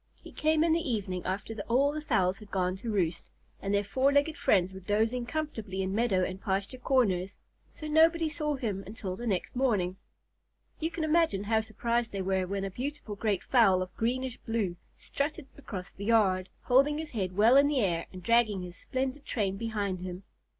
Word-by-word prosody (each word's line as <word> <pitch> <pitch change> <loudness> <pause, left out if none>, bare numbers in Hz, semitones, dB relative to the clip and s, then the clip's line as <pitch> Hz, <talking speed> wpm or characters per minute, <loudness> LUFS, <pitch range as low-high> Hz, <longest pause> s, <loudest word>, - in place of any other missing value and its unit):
He - - -11
came 310 0 +2
in 330 -1 +3
the 330 - +3
evening 190 -5 -2
after 200 +4 -3
all 270 +5 +3
the 305 +1 -4
fowls 195 -9 +1
had 210 -2 -13
gone 185 -1 0
to 230 +4 -6
roost, 175 -5 -1 0.3
and 195 - -2
their 200 0 +2
four 260 +7 +2
legged 285 +2 +2
friends 190 -1 +2
were 190 - -8
dozing 220 +5 0
comfortably 220 -11 -3
in 190 0 -2
meadow 205 -4 +2
and 185 +1 -4
pasture 200 +6 -2
corners, 200 -8 +1 0.3
so 310 - -10
nobody 325 +2 +4
saw 300 -1 -2
him 210 -7 -3
until 200 -3 -5
the 240 +5 -5
next 195 +1 -1
morning. 205 -8 +1 0.8
You 320 - -1
can 335 -1 -4
imagine 315 - +2
how 220 +1 +2
surprised 230 +2 -1
they 195 - -2
were 190 -1 0
when 195 +1 -2
a 195 - -4
beautiful 260 0 -5
great 205 -2 -1
fowl 195 -8 +4
of 185 0 -11
greenish 250 +2 -1
blue 220 -6 -2 0.2
strutted 290 +1 -3
across 195 -9 -7
the 200 - -8
yard, 195 -5 +3
holding 275 +4 +4
his 315 -1 -5
head 185 -5 -3
well 225 +5 +6
in 280 +1 +7
the 285 -3 +1
air 170 -5 0
and 185 -1 -10
dragging 220 -4 +3
his 180 0 -8
splendid 265 +2 -3
train 200 -7 -1
behind 205 -3 -2
him. 180 +1 -6
220 Hz, 195 wpm, -29 LUFS, 190-265 Hz, 0.8 s, in